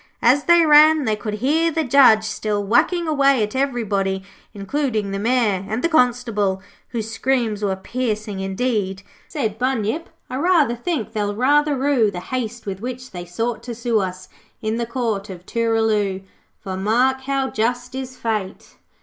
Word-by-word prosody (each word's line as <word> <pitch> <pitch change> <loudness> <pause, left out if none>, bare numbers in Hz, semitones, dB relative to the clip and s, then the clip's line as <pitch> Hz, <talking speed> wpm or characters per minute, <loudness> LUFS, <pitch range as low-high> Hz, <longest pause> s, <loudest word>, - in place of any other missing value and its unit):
As 260 +5 +4
they 345 -1 +6
ran 305 0 +6
they 215 -2 +1
could 210 0 -4
hear 325 +4 +3
the 320 0 -1
Judge 250 -5 +6
still 215 -1 -2
whacking 285 - +2
away 275 -5 +3
at 210 +4 -4
everybody, 205 -8 -1 0.3
including 215 0 -2
the 195 - -3
Mayor, 220 -4 +1
and 220 +3 -2
the 335 - +2
Constable, 235 - +1 0.3
whose 225 -2 -4
screams 225 -3 0
were 195 -2 0
piercing. 215 -1 -3
'Indeed,' 195 -1 -2 0.2
said 225 -8 -3
Bunyip 255 +4 -1 0.2
'I 255 - -5
rather 305 -6 +3
think 255 -1 -3
they'll 205 -1 -2
rather 290 +5 +3
rue 260 -5 +2
The 180 -3 -6
haste 235 +2 -5
with 195 -2 -5
which 255 +1 -6
they 175 -1 -7
sought 225 +7 -3
to 240 -2 -7
sue 235 -1 0
Us, 185 -1 -4 0.3
in 220 +1 -2
the 235 -1 -2
Court 225 -5 -2
of 180 -1 -9
Tooraloo. 220 -4 0 0.4
For, 190 -2 -6
mark 245 +7 +1
how 270 0 -1
just 245 +3 -1
is 260 -1 -6
Fate! 215 -4 -4
230 Hz, 165 wpm, -21 LUFS, 205-265 Hz, 0.4 s, they